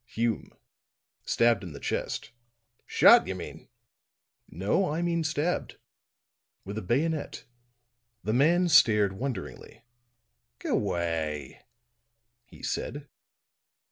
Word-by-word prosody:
"Hume. 115 -1 -2 0.8
Stabbed 115 -3 +3
in 90 -4 -8
the 70 - -9
chest." - - -3 0.6
"Shot, 80 - +6
you 95 - -3
mean." 90 - -9 0.8
"No, 100 - 0
I 165 +3 -1
mean 170 -1 0
stabbed. 155 +2 -2 0.9
With 100 +3 -4
a - - -7
bayonet." 145 - -1 0.8
The 110 - -1
man 170 +8 +4
stared 105 - +5
wonderingly. 95 - -6 0.8
"G'way," 80 -7 -2 0.9
he - - -17
said. 145 0 -4
115 Hz, 95 wpm, -28 LUFS, 90-150 Hz, 0.9 s, Shot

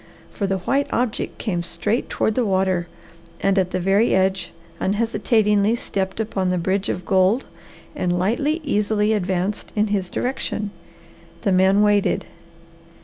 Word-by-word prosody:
For 200 - -2
the 195 0 0
white 275 +10 0
object 240 -2 -1
came 175 -5 -2
straight 175 +7 -2
toward 220 - 0
the 250 - +1
water 190 -3 +1 0.5
and 195 0 +2
at 185 -1 +1
the 185 - -2
very 195 +5 +3
edge 190 -1 +1 0.3
unhesitatingly 210 0 +2
stepped 190 -3 -3
upon 195 -4 -1
the 180 - +1
bridge 190 +3 0
of 180 - -3
gold 190 +7 +3 0.5
and 175 -1 0
lightly, 280 - 0
easily 210 -4 +1
advanced 190 0 -2
in 210 0 +1
his 190 -3 -1
direction. 215 -5 -3 0.7
The 200 - +2
man 190 +2 +4
waited. 205 -1 +2
200 Hz, 145 wpm, -22 LUFS, 185-215 Hz, 0.7 s, man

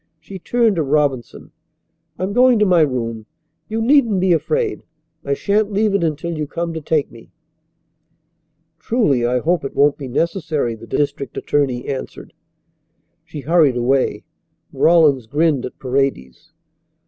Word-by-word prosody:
She 190 +5 -10
turned 230 0 +1
to - - +2
Robinson. 140 -4 -1 0.7
"I - - -4
am 195 +2 -2
going 250 0 +5
to 210 - +3
my 180 -4 +4
room. 115 -6 -2 0.4
You 225 +1 -2
needn't 235 -6 +3
be 185 -1 +3
afraid. 445 - -1 0.4
I 140 - -1
shan't 210 +5 0
leave 205 0 +1
it 200 -3 +1
until 165 +1 -2
you 155 -1 -3
come 170 +2 -4
to 160 - -5
take 150 -1 -1
me." 115 -1 -15 1.5
"Truly 160 - +1
I 125 +1 +1
hope 170 +6 0
it 135 - -6
won't 145 +1 +3
be 135 - -6
necessary," 155 - -1
the 115 +1 -12
district 140 -1 -2
attorney 135 -4 -1
answered. 135 -2 -6 0.9
She 155 -2 -8
hurried 155 -4 +3
away. 130 +2 0 0.5
Rawlins 150 -8 +3
grinned 145 0 +1
at - - -14
Paredes. 130 - -3
155 Hz, 150 wpm, -19 LUFS, 135-190 Hz, 1.5 s, going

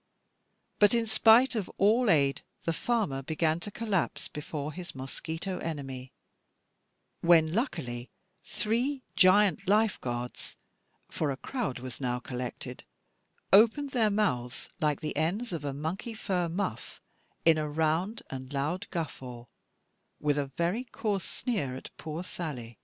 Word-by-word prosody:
But 205 +2 +6
in 230 -1 +2
spite 225 +4 +6
of 215 -6 -2
all 220 +4 +4
aid, 140 -5 +3 0.2
the 165 - 0
farmer 200 - 0
began 160 +3 0
to 190 - -4
collapse 205 -4 -1
before 150 0 -5
his 175 -2 -8
mosquito 160 +7 -4
enemy; 135 -5 -5 1.1
when 165 -2 +5
luckily 155 - -2 0.3
three 250 +5 -1
giant 190 -1 +5
Life 215 +1 +3
guards 120 0 -4 0.6
(for 155 - 0
a 135 - -2
crowd 235 - -3
was 130 +1 -6
now 125 -1 0
collected) 125 0 -6 0.7
opened 235 +8 +6
their 230 -4 +3
mouths, 140 - -1
like 150 -4 +1
the 150 -2 -3
ends 180 +9 0
of 160 -3 -3
a 145 - -1
monkey 160 - -4
fur 180 -5 -1
muff, 165 - -3 0.5
in 165 -1 +6
a 150 -1 -1
round 160 +8 0
and 130 0 -6
loud 155 +8 -1
guffaw, 130 -8 -5 0.7
with 145 -1 +1
a 140 - -1
very 175 +8 +1
coarse 210 -6 -2
sneer 170 - -2
at 130 - -9
poor 160 +2 -5
Sally. 125 - -6
165 Hz, 135 wpm, -30 LUFS, 140-210 Hz, 1.1 s, But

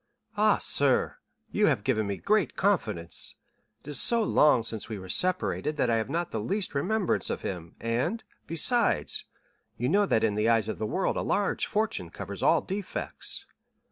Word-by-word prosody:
"Ah, - - +3
sir, - - +2 0.3
you - - +2
have 100 - +1
given 110 -5 0
me 100 -1 -3
confidence; 185 - 0 0.5
it - - -20
is 145 - +4
so 235 -1 +3
long 150 - +4
since 110 -1 -4
we 110 - -4
were 95 -1 -9
separated, 165 - 0
that 120 - +1
I 115 - +2
have 110 +2 -2
not 170 +3 -2
the 110 - -2
least 195 - -2
remembrance 190 +7 0
of - - -4
him, 85 -3 -6
and, 120 - -2 0.2
besides, 230 +9 +3 0.5
you 120 - -1
know 200 +6 +3
that 110 - +1
in 110 -2 +2
the 105 +2 +1
eyes 115 -2 +3
of 110 - -4
the 110 - -2
world 190 - -1
a - - 0
large 200 -1 0
fortune 205 - -1
covers 100 +2 -8
all 165 - +4
defects." 195 0 -4
130 Hz, 175 wpm, -27 LUFS, -, 0.5 s, is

